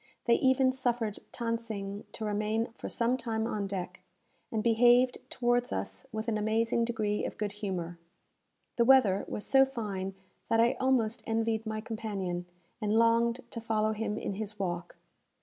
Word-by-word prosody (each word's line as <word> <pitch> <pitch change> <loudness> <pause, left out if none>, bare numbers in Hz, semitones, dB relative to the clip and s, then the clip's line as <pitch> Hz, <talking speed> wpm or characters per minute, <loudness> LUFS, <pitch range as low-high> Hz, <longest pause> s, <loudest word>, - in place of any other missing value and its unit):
They 235 - +5
even 260 +1 +4
suffered 240 -5 -1 0.2
Than 230 -1 0
Sing 205 -3 -6
to 220 - -5
remain 215 +2 0
for - - -6
some 240 +2 +1
time 225 -3 -2
on 210 -3 -2
deck, 190 -2 -5 0.5
and 220 -1 -1
behaved 240 +2 +5
towards 245 0 +1
us 95 0 -4
with 220 +1 -4
an 215 -2 0
amazing 230 +2 +1
degree 215 -3 -1
of - - -4
good 210 -1 -2
humour. 185 -5 -4 0.8
The 235 - +4
weather 230 -7 +5
was 210 - -4
so 270 0 +6
fine 205 -8 -3 0.3
that 225 - +3
I 235 +3 +5
almost 250 -4 +2
envied 225 0 0
my 215 0 -2
companion, 200 -6 -4 0.3
and 210 0 0
longed 230 +2 +3
to 230 - -6
follow 220 -1 +1
him 215 -1 -2
in - - -3
his 210 +1 -5
walk. 175 -3 -3
220 Hz, 165 wpm, -30 LUFS, 205-235 Hz, 0.8 s, so